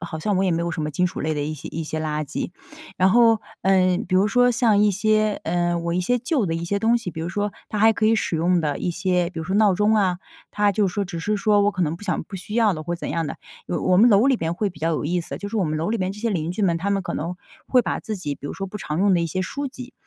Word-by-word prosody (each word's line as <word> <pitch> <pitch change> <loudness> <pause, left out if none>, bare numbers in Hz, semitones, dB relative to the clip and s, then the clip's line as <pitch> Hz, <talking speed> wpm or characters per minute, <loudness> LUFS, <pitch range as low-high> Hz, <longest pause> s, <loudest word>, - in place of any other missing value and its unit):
好 170 -2 -6
像 205 +4 -1
我 190 - +2
也 185 - +2
没 170 0 0
有 170 - -2
什 160 - -3
么 150 - -2
金 180 +5 +1
属 - - -5
类 155 0 -1
的 145 - -2
一 155 +2 -3
些 150 - -8
一 165 0 -4
些 155 +1 -4
垃 155 -1 -2
圾。 - - -5 0.4
然 185 +1 +4
后， 230 -1 +5 0.2
呃， 185 -1 +3
比 185 - 0
如 195 +3 +4
说 245 +3 +4
像 230 -4 +3
一 210 0 +4
些， 215 +1 +1
呃， 175 0 0
我 170 0 -2
一 180 - +1
些 245 +7 +1
旧 255 - 0
的 165 - -1
一 165 +1 -3
些 200 +3 -1
东 230 +3 +3
西， 205 -7 -4
比 160 - -7
如 165 - -3
说， 205 +3 -2 0.2
它 210 - -3
还 220 +1 +6
可 215 0 0
以 225 - +4
使 195 - -1
用 175 +2 +2
的 145 -2 -1
一 175 - -1
些， 175 0 0
比 170 - -8
如 160 - -4
说 190 +4 -2
闹 210 -3 +4
钟 210 +3 +2
啊， 185 -4 +1 0.3
它 205 -1 +2
就 200 -1 +2
是 - - -8
说 205 -1 0
只 170 -2 -6
是 210 +4 0
说 205 0 +3
我 205 +1 +3
可 185 -2 -2
能 155 -1 0
不 - - -15
想 180 -5 -1
不 190 - -12
需 190 +3 -7
要 225 -4 +4
了 155 -2 -5
或 175 +2 -3
者 170 - -9
怎 - - -4
样 165 -2 -1
的， - - -5 0.3
有 - - -2
我 185 0 +3
们 235 +3 +7
楼 210 +2 +5
里 265 -4 +3
边 165 +1 -2
会 200 +1 -1
比 160 - -16
较 165 - 0
有 155 -2 -1
意 175 +3 0
思， - - -7
就 205 - -6
是 225 - -3
我 190 - +2
们 155 0 -1
楼 165 +6 -1
里 230 - 0
边 185 +1 -1
这 210 - -11
些 230 0 -1
邻 165 -4 -2
居 195 +4 -3
们， 170 -3 +2
他 195 +4 -2
们 200 -1 0
可 - - -4
能 170 +4 -4 0.3
会 250 -2 +4
把 - - -2
自 215 -2 -5
己 145 -6 -4
比 145 - -9
如 - - -5
说 195 - -4
不 210 +2 -7
常 155 -3 -4
用 200 0 +4
的 170 - +2
一 170 - 0
些 185 +4 -3
书 280 +9 -4
籍， 255 -1 -10
185 Hz, 355 characters per minute, -23 LUFS, 170-210 Hz, 0.4 s, 们